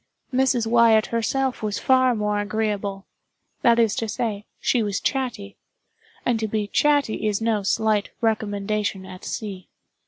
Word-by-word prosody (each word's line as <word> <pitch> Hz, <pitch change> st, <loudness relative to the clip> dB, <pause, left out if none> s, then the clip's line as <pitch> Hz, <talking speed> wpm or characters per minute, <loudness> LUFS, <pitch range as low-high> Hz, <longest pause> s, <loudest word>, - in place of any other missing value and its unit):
Mrs. 255 Hz, -2 st, +2 dB
Wyatt 225 Hz, -1 st, +5 dB
herself 260 Hz, +3 st, 0 dB
was 210 Hz, -2 st, -2 dB
far 255 Hz, -1 st, +3 dB
more 210 Hz, -1 st, 0 dB
agreeable. 205 Hz, -2 st, -2 dB, 0.6 s
That 235 Hz, -1 st, +5 dB
is 225 Hz, -3 st, +3 dB
to 225 Hz, -, -1 dB
say, 210 Hz, -2 st, -3 dB
she 245 Hz, -, +1 dB
was 205 Hz, -2 st, -1 dB
chatty; 240 Hz, -7 st, -3 dB, 0.7 s
and 240 Hz, -2 st, +1 dB
to 220 Hz, -, -1 dB
be 215 Hz, 0 st, -1 dB
chatty 285 Hz, -1 st, +1 dB
is 205 Hz, -1 st, 0 dB
no 225 Hz, -2 st, +1 dB
slight 210 Hz, +1 st, +1 dB
recommendation 210 Hz, -3 st, -1 dB
at 185 Hz, -1 st, -11 dB
sea. 200 Hz, -5 st, -6 dB
220 Hz, 145 wpm, -23 LUFS, 205-235 Hz, 0.7 s, Wyatt